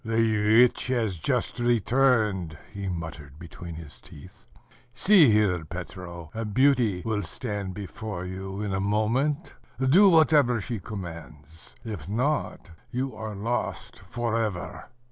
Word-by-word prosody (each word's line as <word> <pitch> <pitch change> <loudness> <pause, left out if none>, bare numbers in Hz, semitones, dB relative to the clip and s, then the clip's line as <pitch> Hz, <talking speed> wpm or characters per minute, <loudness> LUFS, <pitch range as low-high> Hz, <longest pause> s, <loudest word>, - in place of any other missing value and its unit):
"The 110 0 +4
witch 125 - -3
has 115 -9 -1
just 110 - -1
returned," 115 - +2 0.2
he 100 -1 -5
muttered 80 -5 -7
between 85 0 -9
his 80 -3 -11
teeth. 80 +6 -15 0.5
"See 180 - +6
here, 105 -6 +2
Petro: 85 0 -8
a 115 - -3
beauty 115 -4 +2
will 110 -2 0
stand 100 0 -4
before 100 -2 -6
you 95 +2 -6
in 100 -2 -2
a 95 - 0
moment; 115 - 0 0.3
do 165 +10 +6
whatever 150 -8 +4
she 115 +1 -4
commands; 80 -6 -9
if 100 -7 -6
not 125 - -1 0.2
you 130 0 -3
are 110 -1 -6
lost 115 +5 -3
for 115 -1 -2
ever." 100 -6 -4
105 Hz, 130 wpm, -26 LUFS, 90-120 Hz, 0.5 s, See